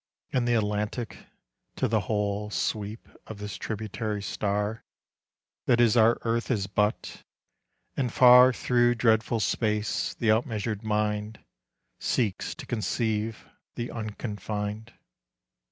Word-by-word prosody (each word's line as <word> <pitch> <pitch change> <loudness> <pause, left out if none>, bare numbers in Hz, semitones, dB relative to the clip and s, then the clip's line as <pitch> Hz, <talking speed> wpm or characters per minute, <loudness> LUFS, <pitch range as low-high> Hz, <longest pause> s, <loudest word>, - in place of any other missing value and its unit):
And 125 -2 +1
the 120 - +3
Atlantic 105 +2 -2 0.5
to - - 0
the 110 0 +2
whole 105 0 -1
Sweep 105 +1 -3 0.2
of 110 - -7
this 105 0 -6
tributary 105 -1 -4
star 105 +2 -2 0.8
That 120 - +4
is 120 -2 +5
our 115 0 +5
earth 115 0 -1
is 105 -6 +1
but... 105 +3 -1 0.7
and 125 -4 -1
far 125 +1 +8
Through 120 -1 +2
dreadful 115 0 +2
space 105 +1 0
the 115 - 0
outmeasured 110 -2 -1
mind 105 0 -2 0.5
Seeks 110 -7 -1
to - - -9
conceive 110 -1 -2 0.3
the 120 0 -4
unconfined. 105 0 -5
110 Hz, 115 wpm, -27 LUFS, 105-115 Hz, 0.8 s, far